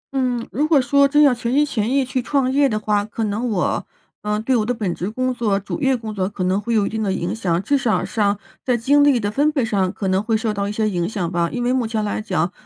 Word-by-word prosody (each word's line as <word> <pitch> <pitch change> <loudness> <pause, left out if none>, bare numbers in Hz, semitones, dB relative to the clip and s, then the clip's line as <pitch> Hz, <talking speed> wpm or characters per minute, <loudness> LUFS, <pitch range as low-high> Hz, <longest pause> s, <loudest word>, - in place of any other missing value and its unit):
嗯， 250 -3 -1
如 295 +4 0
果 310 -3 +4
说 280 +2 +4
真 295 +2 +4
要 280 -3 +6
全 235 -1 -3
心 290 +3 +3
全 230 -6 -2
意 275 0 +2
去 255 0 -2
创 260 0 0
业 280 0 +3
的 215 - -1
话， 210 -1 0
可 220 +2 -5
能 220 +4 -1
我， 195 -5 -1 0.3
呃， 210 0 -1
对 255 +3 +1
我 225 - +2
的 230 - -1
本 215 -7 -2
职 180 - -4
工 255 +3 -1
作、 215 -5 0
主 200 - -6
业 270 -2 +2
工 220 -2 -6
作 190 -2 -1
可 200 -2 -4
能 185 +2 +1
会 235 +1 -1
有 210 -2 +3
一 - - -2
定 220 0 -3
的 200 -3 0
影 185 +1 -2
响， 180 -5 -1
至 285 +4 +1
少 235 -4 0
上 205 -3 0 0.3
在 250 -2 +1
精 285 +5 +3
力 285 -4 +4
的 205 -2 -2
分 290 +6 +2
配 275 -6 0
上 195 -4 0
可 200 -1 -4
能 190 +1 +2
会 220 +1 0
受 220 -1 -2
到 200 0 -2
一 - - -2
些 215 +1 0
影 175 -3 -1
响 185 -6 -3
吧。 170 -1 0
因 245 - -3
为 245 +1 +1
目 255 -3 0
前 220 -1 -2
来 210 - -2
讲， 180 -5 -1
220 Hz, 310 characters per minute, -20 LUFS, 205-255 Hz, 0.3 s, 要